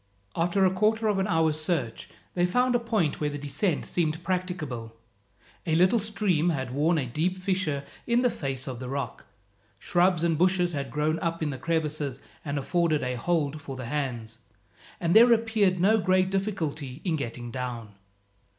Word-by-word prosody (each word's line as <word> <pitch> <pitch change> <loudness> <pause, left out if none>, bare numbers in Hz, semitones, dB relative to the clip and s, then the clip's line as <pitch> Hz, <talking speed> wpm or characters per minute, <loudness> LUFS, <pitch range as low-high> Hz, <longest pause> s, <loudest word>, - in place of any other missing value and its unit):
After 175 +3 +2
a 185 - +3
quarter 220 +3 +2
of 200 -2 +1
an 190 - +1
hour's 160 -3 +1
search, 150 -9 -2 0.2
they 175 0 +2
found 250 +7 +2
a 240 - +3
point 220 -12 0
where 150 - +1
the 145 - -5
descent 145 +4 -1
seemed 160 -1 -1
practicable. 170 -11 -3 0.7
A 160 - +2
little 185 +7 +4
stream 200 -6 +1
had 130 -6 -2
worn 160 +5 +2
a 140 - 0
deep 160 +10 -1
fissure 185 -7 -1 0.2
in 240 +1 +3
the 250 - +4
face 135 -3 -3
of 130 -4 -5
the 125 -1 -6
rock. 140 +1 -4 0.5
Shrubs 180 -2 +2
and 165 -2 +1
bushes 180 -1 +2
had 140 -2 -3
grown 150 +4 0
up 165 -1 -2
in 150 - -1
the 130 - -6
crevices 150 -5 -2 0.2
and 145 -1 -3
afforded 160 +1 +1
a 125 0 -1
hold 150 +2 -1
for 135 - -7
the 130 -1 -6
hands, 120 -4 -3 0.6
and 170 +1 +1
there 235 +2 +8
appeared 220 -5 +2
no 215 +5 +4
great 185 -1 +2
difficulty 160 -9 -3
in 170 -4 +1
getting 120 -4 -5
down. 120 -4 -5
165 Hz, 180 wpm, -27 LUFS, 140-185 Hz, 0.7 s, there